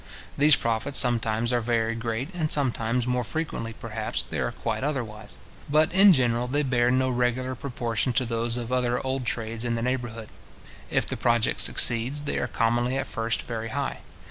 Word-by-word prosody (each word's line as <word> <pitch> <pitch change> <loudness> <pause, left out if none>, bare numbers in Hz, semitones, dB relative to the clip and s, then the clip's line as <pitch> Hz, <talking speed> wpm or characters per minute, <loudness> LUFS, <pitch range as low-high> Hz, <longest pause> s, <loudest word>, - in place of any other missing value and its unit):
These 145 0 +6
profits 115 +4 -1
sometimes 120 -1 +2
are 120 - +1
very 115 -1 0
great, 115 +7 -4
and 160 -3 -2
sometimes, 125 -3 +1
more 125 0 0
frequently, 120 -4 -4
perhaps, 110 -1 -2
they - - -5
are - - -1
quite - - -3
otherwise; 110 -7 -4 0.3
but, 155 +3 +3
in 195 +1 +7
general, 125 -5 +2
they 145 +4 0
bear 125 -3 +2
no 130 +1 +2
regular 125 +1 0
proportion 120 -2 -2
to 130 +1 +1
those 115 +1 -1
of 120 0 -5
other 125 -1 +1
old 130 -1 -2
trades 115 0 -3
in 120 -1 -1
the 115 - -2
neighbourhood. 120 -3 -3 0.6
If - - +1
the - - -3
project 120 -2 +1
succeeds, 120 +5 +3
they 145 - -2
are - - -1
commonly 120 +3 0
at 135 - -2
first 115 -3 -1
very 115 -1 -5
high. 140 +3 -3
120 Hz, 180 wpm, -26 LUFS, 115-130 Hz, 0.6 s, in